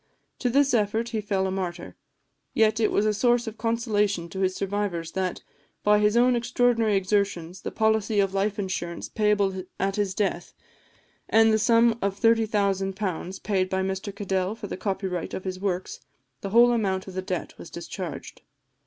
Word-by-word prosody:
To 250 Hz, -, 0 dB
this 275 Hz, +2 st, +3 dB
effort 220 Hz, +1 st, +1 dB
he 225 Hz, -2 st, -2 dB
fell 200 Hz, -2 st, 0 dB
a 190 Hz, -, -1 dB
martyr; 180 Hz, -2 st, -4 dB, 0.6 s
yet 220 Hz, 0 st, +3 dB
it 220 Hz, -, +2 dB
was 205 Hz, -, +2 dB
a 215 Hz, -, +2 dB
source 240 Hz, +2 st, +2 dB
of 225 Hz, -1 st, -7 dB
consolation 210 Hz, -6 st, 0 dB
to 190 Hz, -, -6 dB
his 185 Hz, -1 st, +1 dB
survivors, 195 Hz, -5 st, -2 dB
that, 185 Hz, -1 st, -3 dB, 0.4 s
by 210 Hz, 0 st, +5 dB
his 210 Hz, +2 st, +3 dB
own 250 Hz, +1 st, +5 dB
extraordinary 235 Hz, -2 st, +2 dB
exertions, 190 Hz, -3 st, -1 dB
the -, -, -4 dB
policy 220 Hz, -1 st, +1 dB
of 195 Hz, -1 st, +1 dB
life 200 Hz, +1 st, 0 dB
insurance 180 Hz, -4 st, -4 dB
payable 205 Hz, -3 st, +1 dB, 0.2 s
at 195 Hz, +1 st, 0 dB
his 200 Hz, -3 st, -1 dB
death, 185 Hz, -4 st, -2 dB, 0.8 s
and 225 Hz, 0 st, +5 dB
the 220 Hz, -, +3 dB
sum 230 Hz, +1 st, +4 dB
of 200 Hz, 0 st, -1 dB
£30,000 195 Hz, -4 st, 0 dB
paid 190 Hz, -3 st, 0 dB
by 190 Hz, 0 st, 0 dB
Mr 190 Hz, +1 st, -4 dB
Cadell 190 Hz, 0 st, -1 dB
for 225 Hz, -, -8 dB
the -, -, -5 dB
copyright 190 Hz, -2 st, -3 dB
of 190 Hz, -, -5 dB
his 185 Hz, -1 st, -4 dB
works, 185 Hz, -2 st, -3 dB, 0.4 s
the 195 Hz, -, -4 dB
whole 240 Hz, +4 st, +6 dB
amount 195 Hz, -5 st, 0 dB
of 190 Hz, -, -8 dB
the 185 Hz, -, -2 dB
debt 185 Hz, -1 st, -4 dB
was -, -, -9 dB
discharged. -, -, -7 dB
200 Hz, 175 wpm, -26 LUFS, 190-220 Hz, 0.8 s, whole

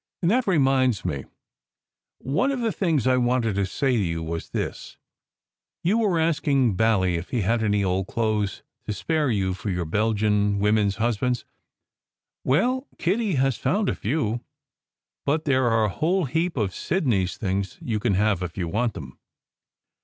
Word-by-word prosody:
And 170 Hz, -, +3 dB
that 250 Hz, 0 st, +2 dB
reminds 135 Hz, -, +2 dB
me: 70 Hz, -3 st, -3 dB, 0.9 s
one 150 Hz, -, 0 dB
of 270 Hz, -, -2 dB
the 230 Hz, -2 st, +1 dB
things 165 Hz, -, 0 dB
I 130 Hz, 0 st, +4 dB
wanted 120 Hz, -3 st, +1 dB
to 100 Hz, 0 st, 0 dB
say 130 Hz, +4 st, 0 dB
to 105 Hz, -, +1 dB
you 85 Hz, -2 st, -2 dB
was 80 Hz, 0 st, -5 dB
this: -, -, -5 dB, 0.9 s
you 205 Hz, +7 st, +2 dB
were 200 Hz, -6 st, +2 dB
asking 145 Hz, -7 st, +2 dB
Bally 95 Hz, -5 st, +2 dB
if 85 Hz, -, -6 dB
he 120 Hz, -, 0 dB
had 115 Hz, +4 st, +1 dB
any 105 Hz, -2 st, +1 dB
old 95 Hz, 0 st, 0 dB
clothes 110 Hz, -3 st, -1 dB, 0.2 s
to 105 Hz, -, -1 dB
spare 155 Hz, +6 st, 0 dB
you 95 Hz, -5 st, 0 dB
for 100 Hz, +3 st, -5 dB
your 90 Hz, -2 st, -1 dB
Belgian 105 Hz, +2 st, +1 dB
women 105 Hz, +1 st, +3 dB
s 100 Hz, -, -1 dB
husbands. 120 Hz, +2 st, 0 dB, 1.0 s
Well, 250 Hz, -, +1 dB
Kitty 195 Hz, +1 st, 0 dB
has 135 Hz, -2 st, +1 dB
found 205 Hz, +1 st, 0 dB
a -, -, -1 dB
few, 120 Hz, -2 st, -1 dB, 0.8 s
but 155 Hz, +3 st, 0 dB
there 130 Hz, -3 st, +2 dB
are 115 Hz, -1 st, +3 dB
a -, -, 0 dB
whole 170 Hz, -, 0 dB
heap 165 Hz, +4 st, -1 dB
of 100 Hz, -5 st, 0 dB
Sidney 125 Hz, -, 0 dB
s 90 Hz, -, -6 dB
things 100 Hz, -1 st, -2 dB
you 110 Hz, -3 st, -2 dB
can 105 Hz, -3 st, +1 dB
have 100 Hz, -2 st, +2 dB
if 90 Hz, -2 st, -5 dB
you 90 Hz, -3 st, -2 dB
want 110 Hz, +6 st, -1 dB
them. 65 Hz, -5 st, -9 dB
115 Hz, 175 wpm, -24 LUFS, 100-150 Hz, 1.0 s, I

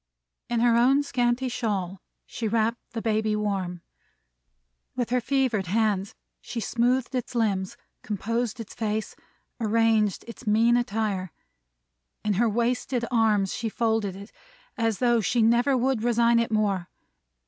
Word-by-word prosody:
In 235 Hz, -1 st, 0 dB
her 240 Hz, -1 st, +4 dB
own 265 Hz, +5 st, +4 dB
scanty 245 Hz, -2 st, 0 dB
shawl, 200 Hz, -7 st, -3 dB, 0.2 s
she 225 Hz, -, -4 dB
wrapped 225 Hz, +2 st, +1 dB
the 225 Hz, -, -4 dB
baby 215 Hz, -1 st, +1 dB
warm. 190 Hz, -5 st, -2 dB, 1.1 s
With 245 Hz, -1 st, -2 dB
her 250 Hz, 0 st, +2 dB
fevered 245 Hz, -7 st, 0 dB
hands, 205 Hz, -1 st, 0 dB, 0.3 s
she 240 Hz, -, -5 dB
smoothed 245 Hz, +4 st, 0 dB
its 250 Hz, -1 st, -3 dB
limbs, 200 Hz, -5 st, 0 dB, 0.2 s
composed 230 Hz, +3 st, -2 dB
its 225 Hz, -, -8 dB
face, 215 Hz, -1 st, -3 dB, 0.4 s
arranged 220 Hz, -2 st, +2 dB
its 230 Hz, 0 st, -11 dB
mean 225 Hz, +3 st, +4 dB
attire. 210 Hz, -6 st, -1 dB, 0.9 s
In 210 Hz, -, +2 dB
her 225 Hz, +4 st, +2 dB
wasted 240 Hz, +2 st, 0 dB
arms 215 Hz, -5 st, +2 dB
she 225 Hz, -, -3 dB
folded 220 Hz, -4 st, 0 dB
it, 200 Hz, +3 st, -11 dB, 0.4 s
as 225 Hz, -5 st, 0 dB
though 240 Hz, -2 st, +3 dB
she 230 Hz, +2 st, +1 dB
never 240 Hz, +4 st, +3 dB
would 255 Hz, -2 st, +1 dB
resign 235 Hz, 0 st, +3 dB
it 230 Hz, -, 0 dB
more. 205 Hz, -5 st, 0 dB
225 Hz, 135 wpm, -26 LUFS, 210-240 Hz, 1.1 s, her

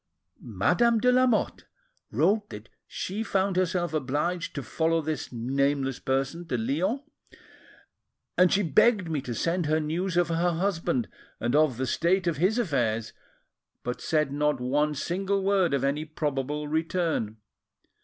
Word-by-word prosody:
Madame 175 Hz, -, +2 dB
de 250 Hz, +3 st, +4 dB
Lamotte 255 Hz, -2 st, +2 dB, 0.4 s
wrote 210 Hz, +1 st, +1 dB
that 105 Hz, +2 st, -10 dB, 0.2 s
she 200 Hz, +4 st, -4 dB
found 195 Hz, -3 st, 0 dB
herself 180 Hz, -2 st, 0 dB
obliged 155 Hz, +5 st, -1 dB
to 140 Hz, -, -3 dB
follow 165 Hz, +3 st, +1 dB
this 155 Hz, -1 st, -4 dB
nameless 135 Hz, +2 st, 0 dB
person 135 Hz, +6 st, -2 dB
to 125 Hz, -, -1 dB
Lyons; 175 Hz, -, 0 dB, 1.3 s
and 180 Hz, -1 st, +5 dB
she 205 Hz, -, +3 dB
begged 180 Hz, -, +3 dB
me 150 Hz, -3 st, -1 dB
to 125 Hz, -3 st, -5 dB
send 170 Hz, +2 st, 0 dB
her 155 Hz, +1 st, +2 dB
news 170 Hz, +4 st, -2 dB
of 175 Hz, -1 st, +3 dB
her 170 Hz, +1 st, +1 dB
husband 165 Hz, -, 0 dB, 0.3 s
and 120 Hz, +4 st, 0 dB
of 150 Hz, -5 st, +3 dB
the 130 Hz, -, -1 dB
state 175 Hz, +8 st, +1 dB
of 170 Hz, -4 st, 0 dB
his 190 Hz, -, +2 dB
affairs, 120 Hz, -, 0 dB, 0.7 s
but 125 Hz, -, -4 dB
said 155 Hz, -3 st, +1 dB
not 150 Hz, -1 st, +1 dB
one 145 Hz, +4 st, +1 dB
single 195 Hz, +6 st, -1 dB
word 195 Hz, -4 st, +2 dB
of 140 Hz, -1 st, 0 dB
any 140 Hz, +3 st, 0 dB
probable 150 Hz, -1 st, -3 dB
return. 160 Hz, -, -1 dB
160 Hz, 145 wpm, -27 LUFS, 135-185 Hz, 1.3 s, and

